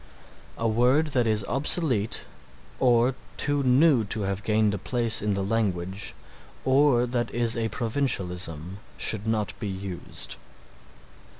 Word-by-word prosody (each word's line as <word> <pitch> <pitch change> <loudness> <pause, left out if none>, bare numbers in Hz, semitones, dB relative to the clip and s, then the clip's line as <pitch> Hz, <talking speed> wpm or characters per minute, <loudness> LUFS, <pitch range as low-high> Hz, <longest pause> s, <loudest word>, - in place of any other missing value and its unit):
A 115 - -1
word 125 +8 +2
that 120 -3 +2
is 105 -1 +1
obsolete 135 - +2 0.5
or 125 0 +3 0.2
too 145 -1 +2
new 135 0 +4
to 105 +2 -1
have 100 0 -2
gained 105 0 +1
a 100 - -3
place 120 +1 0
in 105 -1 0
the 100 - -2
language, 100 -2 -2 0.5
or 130 -2 +4
that 120 -1 -2
is 120 -1 +1
a 115 -1 -1
provincialism, 95 - -2 0.2
should 110 0 0
not 110 -2 0
be 105 - -4
used. 95 -2 -3
115 Hz, 130 wpm, -26 LUFS, 100-125 Hz, 0.5 s, new